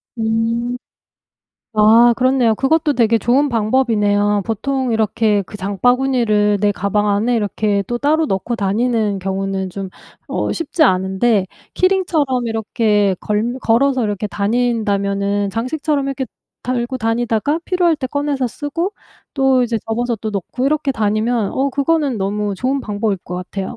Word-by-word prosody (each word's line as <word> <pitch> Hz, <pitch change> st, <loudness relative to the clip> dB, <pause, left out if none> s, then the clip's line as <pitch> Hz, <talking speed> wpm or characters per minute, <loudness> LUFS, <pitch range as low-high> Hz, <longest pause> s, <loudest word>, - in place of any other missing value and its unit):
음. 230 Hz, +2 st, -1 dB, 1.0 s
아 230 Hz, +3 st, +6 dB
그렇네요. 255 Hz, -3 st, +3 dB
그것도 295 Hz, +4 st, +1 dB
되게 230 Hz, -1 st, +3 dB
좋은 265 Hz, +6 st, +2 dB
방법이네요. 210 Hz, -3 st, +1 dB
보통 255 Hz, +3 st, -1 dB
이렇게 215 Hz, -1 st, +1 dB
그 210 Hz, -, -10 dB
장바구니를 215 Hz, 0 st, +2 dB
내 205 Hz, -1 st, +2 dB
가방 200 Hz, +2 st, 0 dB
안에 220 Hz, +4 st, +1 dB
이렇게 205 Hz, -1 st, 0 dB
또 240 Hz, 0 st, -2 dB
따로 310 Hz, +4 st, +2 dB
넣고 210 Hz, +4 st, -2 dB
다니는 210 Hz, 0 st, 0 dB
경우는 195 Hz, 0 st, -2 dB
좀 195 Hz, 0 st, -6 dB, 0.4 s
어 -, -, -2 dB
쉽지 330 Hz, -1 st, -1 dB
않은데 190 Hz, 0 st, +2 dB, 0.3 s
키링처럼 320 Hz, -10 st, +1 dB
이렇게 210 Hz, -3 st, +1 dB
걸릴 225 Hz, +5 st, -1 dB
걸어서 255 Hz, +2 st, +2 dB
이렇게 205 Hz, 0 st, -2 dB
다닌다면은 200 Hz, -2 st, 0 dB
장식처럼 280 Hz, -, -1 dB
이렇게 270 Hz, -1 st, -2 dB, 0.4 s
달고 250 Hz, +1 st, -2 dB
다니다가 230 Hz, +5 st, 0 dB
필요할 355 Hz, -3 st, +2 dB
때 265 Hz, -3 st, -3 dB
꺼내서 285 Hz, -2 st, -1 dB
쓰고 330 Hz, -, -3 dB, 0.4 s
또 265 Hz, -2 st, +3 dB
이제 235 Hz, -1 st, -1 dB
접어서 235 Hz, +1 st, -1 dB
또 215 Hz, +1 st, -5 dB
넣고 210 Hz, +6 st, -4 dB
이렇게 300 Hz, -1 st, +1 dB
다니면 215 Hz, 0 st, 0 dB
어 275 Hz, +1 st, 0 dB
그거는 285 Hz, -2 st, 0 dB
너무 205 Hz, +1 st, -2 dB
좋은 265 Hz, +5 st, -1 dB
방법일 205 Hz, -3 st, -2 dB
것 180 Hz, -, -8 dB
같아요. 190 Hz, +4 st, -5 dB
230 Hz, 320 characters per minute, -18 LUFS, 205-260 Hz, 1.0 s, 아